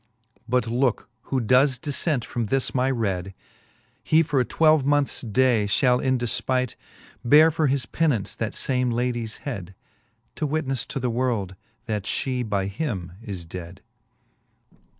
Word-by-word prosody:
But 125 -1 +2
looke 120 +1 0 0.2
who 135 - +1
does 130 +3 +3
diflent 145 -1 -1
from 115 -2 -3
this 135 +3 0
my 130 0 +1
read, 95 -7 -2 0.7
He 160 +1 +4
for 145 -4 0
a 125 - +2
twelve 155 0 +3
moneths 145 0 +1
day 120 -2 +2
fhall 125 +3 +3
in 130 -1 +2
defpight 125 +1 0 0.5
Beare 150 +6 +6
for 155 -1 +1
his 135 -1 0
penaunce 145 -12 0
that - - -3
fame 125 -2 0
ladies 120 -2 -2
head; 100 -9 -5 0.6
To 155 - -1
witnefle 140 -4 -1
to - - -4
the 125 -2 -1
worlde, 115 -6 -1 0.3
that 105 -4 -3
fhe 130 +1 -1
by 100 -2 0
him 100 - -4
is 95 -7 -6
dead. 90 +1 -9
125 Hz, 150 wpm, -24 LUFS, 110-135 Hz, 0.7 s, Beare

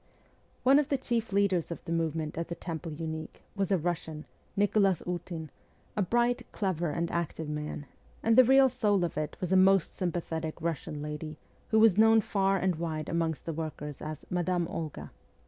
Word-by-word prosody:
One 270 +3 +6
of 295 -1 -1
the 280 - +2
chief 235 -4 -2
leaders 195 -4 +2
of 170 - -7
the - - -5
movement 160 -2 -1
at 165 0 -3
the 170 - -4
Temple 165 -1 -5
Unique 160 0 -6
was 200 -2 -1
a 190 - +4
Russian, 160 -2 -3 0.3
Nicholas 200 -3 +3
Ootin, 170 -3 -5 0.4
a 210 - +1
bright, 240 +5 +1
clever, 175 -5 -1
and 170 +2 -2
active 160 -2 -2
man; 150 -1 -4 0.4
and 225 0 +4
the 255 - +9
real 265 +2 +6
soul 210 -7 +1
of 170 - -2
it 155 0 -3
was 180 0 -1
a - - +5
most 190 -2 +4
sympathetic 165 -3 -3
Russian 160 -2 -3
lady, 150 +1 -5 0.3
who 220 - +2
was 220 -3 +6
known 225 0 +7
far 195 -2 +1
and 185 -3 0
wide 160 -2 -3
amongst 165 -2 -1
the 165 - -3
workers 150 -2 -5
as 155 0 -6
Madame 180 -1 0
Olga. 160 -4 -5
170 Hz, 180 wpm, -30 LUFS, 160-200 Hz, 0.4 s, the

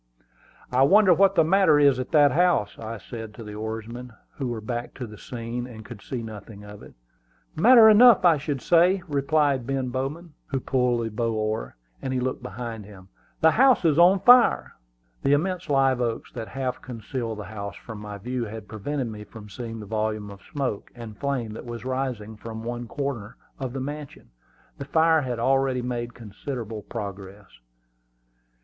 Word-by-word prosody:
"I 125 +1 +2
wonder 190 +6 +6
what 195 +2 +4
the 165 - +5
matter 175 -2 +4
is 140 -3 +4
at 130 - -4
that 145 -3 +5
house," 165 - +2
I 115 0 -6
said 110 +3 -9
to 115 - -9
the 105 -1 -8
oarsmen, 110 +3 -6 0.2
who 135 - -2
were 120 -2 -3
back 120 +2 -5
to 125 - -5
the 105 -2 -12
scene, 120 0 -5
and 110 -3 -11
could 115 -5 -10
see 120 +1 -5
nothing 105 -1 -10
of 105 0 -11
it. - - -14 0.6
"Matter 230 +6 +8
enough, 220 -2 +7
I 165 -3 +6
should 140 -2 -4
say," 180 +2 +4
replied 140 -3 +1
Ben 135 -2 -1
Bowman, 145 +6 -4
who 135 - -2
pulled 125 -3 0
the 115 - -4
bow 115 +2 -1
oar, 110 - -2 0.3
as 130 - -3
he 130 - 0
looked 130 +1 -2
behind 115 +1 -6
him. 95 -2 -14 0.3
"The 160 - +6
house 260 -3 +4
is 160 -1 +3
on 185 +2 +6
fire!" 245 0 +5 0.5
The 140 - +3
immense 175 +3 -1
live 135 -2 +3
oaks 115 -2 -3
that 115 -2 -6
half 130 +2 -4
concealed 115 -1 -5
the 105 - -6
house 100 0 -7
from 110 -3 -9
my 105 -1 -7
view 125 +4 -3
had 110 -1 -8
prevented 130 +6 -3
me 105 -2 -7
from 105 0 -12
seeing 115 +2 -7
the 105 - -8
volume 110 -1 -2
of 100 0 -12
smoke 135 -8 -3
and 115 -3 -9
flame 125 -3 -3
that 110 - -8
was 120 0 -7
rising 125 -5 -3
from 110 +1 -8
one 120 0 -5
corner 130 -6 -4 0.2
of 130 -2 -4
the 135 - -4
mansion. 145 - -7 0.5
The 140 - -5
fire 160 +2 +3
had 125 -3 -3
already 130 +1 +1
made 120 -1 -4
considerable 115 0 -6
progress. 100 -2 -7
125 Hz, 185 wpm, -25 LUFS, 110-140 Hz, 0.6 s, Matter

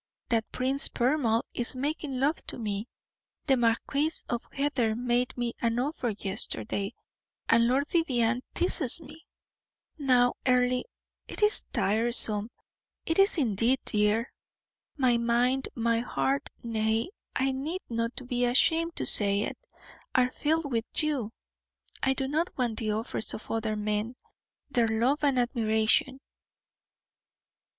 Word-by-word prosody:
That 225 -2 0
Prince 265 +2 +2
Poermal 245 -3 0
is 240 +1 +1
making 280 0 -3
love 290 +4 +1
to - - -5
me, 210 -1 -4 0.6
the 270 - +3
Marquis 250 +5 0 0.2
of 240 -1 -2
Heather 265 -6 0
made 245 +2 -1
me 240 -1 -2
an 230 0 0
offer 255 -1 -2
yesterday, 195 - -2 0.5
and 230 0 +4
Lord 270 +4 +1
Vivianne 250 -8 0
teases 340 -6 +2
me. 320 +1 -14 0.7
Now, 250 -3 +3
Earle, 250 0 +2 0.5
it - - -4
is 420 - +3
tiresome, 220 0 +4 0.6
it 325 +3 0
is 390 -1 +4
indeed, 235 -1 +2
dear. 210 +3 +1 0.6
My 250 -4 +2
mind, 245 +3 +1
my 230 0 0
heart 270 +3 -2
nay, 225 - -1 0.2
I 265 0 +1
need 300 +8 -4
not 230 +2 -4
be 245 -1 -1
ashamed 325 +7 +2
to - - -1
say 200 -1 +7
it - - -6 0.5
are 255 0 +3
filled 310 0 -1
with 230 -1 -1 0.2
you. 275 -8 -2 0.7
I 265 0 +1
do 270 - -2
not 315 +5 -1
want 240 -4 -1
the 215 -2 -2
offers 220 +1 -3
of - - -9
other 220 -1 -2
men 210 +3 -2 0.6
their 235 -3 +2
love 240 +7 0
and 280 -3 +2
admiration." 235 +2 +1
245 Hz, 130 wpm, -28 LUFS, 225-275 Hz, 0.7 s, say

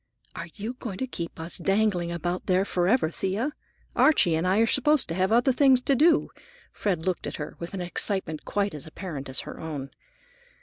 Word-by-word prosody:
"Are 170 - -5
you 220 +4 -4
going 205 -6 -5
to 260 - -2
keep 170 -11 -6
us 165 +2 -4
dangling 195 -4 +1
about 175 +1 -2
here 185 +1 +3
forever, 180 -1 +2
Thea? 200 - -2 0.4
Archie 235 - +4
and 160 +3 +1
I 190 +2 +3
are 225 - +5
supposed 280 +4 +3
to - - -1
have 185 +3 +1
other 240 +4 +4
things 265 -1 +5
to 275 +2 +2
do." 325 +6 +4 0.4
Fred 180 -6 -1
looked 185 -3 -1
at - - -5
her 150 - -6
with 170 +3 -6
an 185 - -4
excitement 175 -2 -1
quite 200 0 -1
as 150 0 -7
apparent 155 -5 -7
as 130 - -2
her - - -9
own. 145 -4 -5
185 Hz, 200 wpm, -26 LUFS, 170-225 Hz, 0.4 s, are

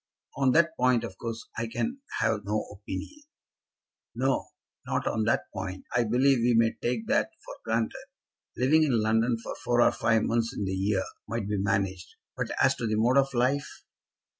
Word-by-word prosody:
"On 135 -1 +3
that 165 0 +3
point, 125 -2 +3
of 95 - -6
course, 115 -1 -5
I 115 - -1
can 245 - -3 0.2
have 110 -2 +1
no 105 +2 -1
opinion." 105 - -7 0.9
"No; 130 +2 0 0.4
not - - -1
on 110 -1 0
that 110 - +2
point. 95 -1 -5
I 120 -1 +3
believe 130 +4 +3
we 120 0 +3
may 115 0 +4
take 120 -2 -2
that - - +2 0.2
for - - -8
granted. 115 0 -2 0.5
Living 145 +6 +4
in 135 -7 +3
London 115 +2 +2
for 115 - -6
four 120 0 +1
or 120 - +6
five 110 -1 +2
months 115 +2 0
in 100 - -1
the 95 - -2
year 95 0 +1 0.2
might 115 -3 -3
be 105 -1 -1
managed. 95 -2 -1 0.2
But - - -3
as - - +5
to 115 - -2
the 110 - 0
mode 120 +5 +4
of 135 0 +1
life!" 130 +4 0
115 Hz, 185 wpm, -28 LUFS, 105-125 Hz, 0.9 s, or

